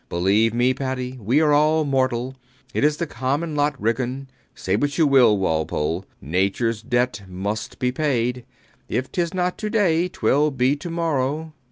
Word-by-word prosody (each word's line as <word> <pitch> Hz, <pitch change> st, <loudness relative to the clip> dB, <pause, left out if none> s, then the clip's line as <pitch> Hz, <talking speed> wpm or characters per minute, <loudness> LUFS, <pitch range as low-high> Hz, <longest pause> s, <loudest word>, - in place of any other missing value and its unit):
Believe 100 Hz, +6 st, +2 dB
me, 120 Hz, +3 st, +2 dB
Paddy, 130 Hz, -1 st, -4 dB
we 125 Hz, +9 st, +2 dB
are 150 Hz, -2 st, +4 dB
all 155 Hz, +1 st, +3 dB
mortal. 130 Hz, -2 st, 0 dB, 0.4 s
It -, -, 0 dB
is 150 Hz, 0 st, +3 dB
the 170 Hz, -, -1 dB
common 145 Hz, +4 st, -2 dB
lot, 145 Hz, -1 st, 0 dB
Ridgeon. 125 Hz, +4 st, -1 dB, 0.3 s
Say 95 Hz, -, -1 dB
what 145 Hz, +6 st, -1 dB
you 165 Hz, -, +4 dB
will, 130 Hz, -7 st, +5 dB
Walpole, 80 Hz, 0 st, -1 dB
Nature's 100 Hz, -, 0 dB
debt 120 Hz, -2 st, 0 dB
must 100 Hz, +4 st, -4 dB
be 125 Hz, 0 st, 0 dB
paid. 125 Hz, -4 st, -1 dB, 0.5 s
If 130 Hz, +1 st, -2 dB
tis 170 Hz, -2 st, -1 dB
not 180 Hz, -1 st, -1 dB
to 215 Hz, -, -3 dB
day, 180 Hz, -6 st, +2 dB
twill 150 Hz, -4 st, +1 dB
be 130 Hz, 0 st, +1 dB
to 150 Hz, +4 st, -7 dB
morrow. 160 Hz, -2 st, -1 dB
130 Hz, 165 wpm, -22 LUFS, 115-150 Hz, 0.5 s, will